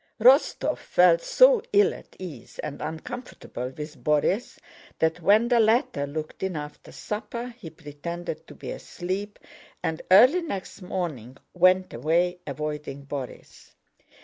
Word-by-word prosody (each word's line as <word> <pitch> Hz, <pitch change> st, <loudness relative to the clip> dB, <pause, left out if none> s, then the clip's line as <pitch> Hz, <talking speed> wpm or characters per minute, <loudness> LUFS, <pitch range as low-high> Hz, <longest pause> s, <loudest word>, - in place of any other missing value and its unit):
Rostóv 260 Hz, +7 st, +4 dB
felt 175 Hz, -2 st, +4 dB
so -, -, +5 dB
ill 415 Hz, +2 st, +5 dB
at -, -, -14 dB
ease 165 Hz, -10 st, -9 dB
and -, -, -6 dB
uncomfortable 160 Hz, -, -6 dB
with 150 Hz, 0 st, -8 dB
Borís 150 Hz, +10 st, +1 dB, 0.4 s
that, 160 Hz, +2 st, 0 dB
when 210 Hz, +7 st, +4 dB
the 240 Hz, -1 st, +3 dB
latter 220 Hz, -, +2 dB
looked 155 Hz, +2 st, -6 dB
in 190 Hz, -2 st, -2 dB
after 150 Hz, -1 st, -8 dB
supper, 235 Hz, +3 st, -5 dB
he 170 Hz, -, -8 dB
pretended 160 Hz, +2 st, -7 dB
to -, -, -12 dB
be -, -, -7 dB
asleep, 190 Hz, +4 st, -5 dB, 0.5 s
and 160 Hz, 0 st, -2 dB
early 250 Hz, -, +7 dB
next 200 Hz, -, -6 dB
morning 150 Hz, -10 st, -4 dB, 0.2 s
went 185 Hz, +1 st, +3 dB
away, 170 Hz, +8 st, +1 dB
avoiding 150 Hz, -1 st, -5 dB
Borís. 140 Hz, -3 st, -8 dB
175 Hz, 130 wpm, -26 LUFS, 150-215 Hz, 0.5 s, early